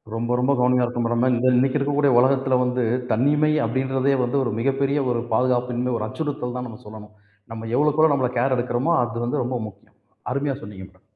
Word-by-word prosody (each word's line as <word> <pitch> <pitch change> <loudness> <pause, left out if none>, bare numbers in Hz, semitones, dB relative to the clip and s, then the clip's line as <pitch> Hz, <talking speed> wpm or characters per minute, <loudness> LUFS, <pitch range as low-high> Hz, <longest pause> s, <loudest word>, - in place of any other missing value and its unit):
ரொம்ப, 120 +1 -3
ரொம்ப 130 +3 +1
கவனமா 125 0 +3
இருக்கனும் 120 -1 -2 0.2
மேடம். 130 0 +2
இந்த 130 - +1
இன்னக்கி 130 +3 +2
இருக்கக்கூடிய 145 0 +1
உலகத்தில 130 0 +2
வந்து, 125 0 -1 0.3
தனிமை 145 +6 +2
அப்பிடின்றதே 130 +3 0
வந்து, 120 +3 -1
ஒரு 120 - -2
மிகப்பெரிய 140 +2 0
ஒரு 120 -1 -1
பாதுகாப்பின்மை, 125 +1 0
ஒரு 110 - -3
அச்சுறுத்தல் 125 -1 -4
தான் 125 0 -5
நாம 110 - -11
சொல்லணும். 105 0 -12 0.4
நம்ம 115 0 -7
எவ்வளவுக்கு 150 +2 +1
எவ்வளோ 160 -2 +5
நம்மள 130 -3 0
கேர் 130 +2 +2
எடுக்கிறோமோ, 125 +6 0
அது 120 0 -3
வந்து 130 +2 -1
ரொம்ப 125 +1 -3
முக்கியம். 100 -1 -17 0.3
அருமையா 140 +1 -1
சொன்னீங்க 95 -2 -9
மேடம். 95 -1 -25
125 Hz, 190 wpm, -22 LUFS, 120-140 Hz, 0.4 s, எவ்வளோ